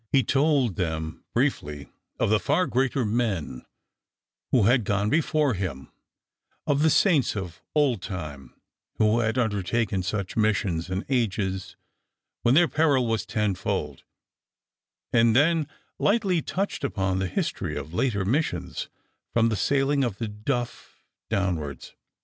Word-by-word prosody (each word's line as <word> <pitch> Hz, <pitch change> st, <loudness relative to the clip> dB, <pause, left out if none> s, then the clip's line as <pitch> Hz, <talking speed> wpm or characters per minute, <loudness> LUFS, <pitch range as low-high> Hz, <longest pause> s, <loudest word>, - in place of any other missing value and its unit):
He 135 Hz, -2 st, +4 dB
told 135 Hz, -, +2 dB
them 80 Hz, -3 st, -3 dB
briefly 75 Hz, -1 st, -1 dB, 0.3 s
of -, -, +2 dB
the 110 Hz, -, +4 dB
far 155 Hz, +10 st, +1 dB
greater 130 Hz, -2 st, 0 dB
men 105 Hz, -, -1 dB, 0.9 s
who 125 Hz, -5 st, +4 dB
had 120 Hz, +3 st, +4 dB
gone 100 Hz, +1 st, 0 dB
before 155 Hz, -3 st, +2 dB
him, 90 Hz, -9 st, -5 dB, 0.7 s
of 145 Hz, -2 st, +1 dB
the 160 Hz, -, +5 dB
saints 155 Hz, -, +3 dB
of 90 Hz, -5 st, -6 dB
old 135 Hz, -9 st, +2 dB
time, 75 Hz, -9 st, -7 dB, 0.4 s
who 110 Hz, +1 st, +3 dB
had 115 Hz, +1 st, 0 dB
undertaken 105 Hz, -2 st, 0 dB
such 95 Hz, +1 st, -3 dB
missions 100 Hz, -6 st, 0 dB
in 95 Hz, +2 st, -3 dB
ages 95 Hz, -7 st, -1 dB, 0.7 s
when 120 Hz, +3 st, +3 dB
their 175 Hz, +2 st, +6 dB
peril 145 Hz, -6 st, +2 dB
was 115 Hz, -2 st, -1 dB
tenfold, 105 Hz, -4 st, -2 dB, 1.1 s
and 115 Hz, -1 st, +4 dB
then 155 Hz, +2 st, +3 dB, 0.3 s
lightly 200 Hz, -6 st, +2 dB
touched 195 Hz, +6 st, -3 dB
upon 95 Hz, -1 st, 0 dB
the 95 Hz, -, 0 dB
history -, -, -2 dB
of 80 Hz, -, -7 dB
later 100 Hz, -1 st, 0 dB
missions, 90 Hz, -, -1 dB, 0.4 s
from 115 Hz, -1 st, +3 dB
the 110 Hz, -, 0 dB
sailing 140 Hz, +4 st, +2 dB
of 115 Hz, -6 st, -2 dB
the 115 Hz, -, -3 dB
Duff 120 Hz, +4 st, -4 dB, 0.3 s
downwards. 80 Hz, -8 st, -2 dB
110 Hz, 130 wpm, -26 LUFS, 95-135 Hz, 1.1 s, their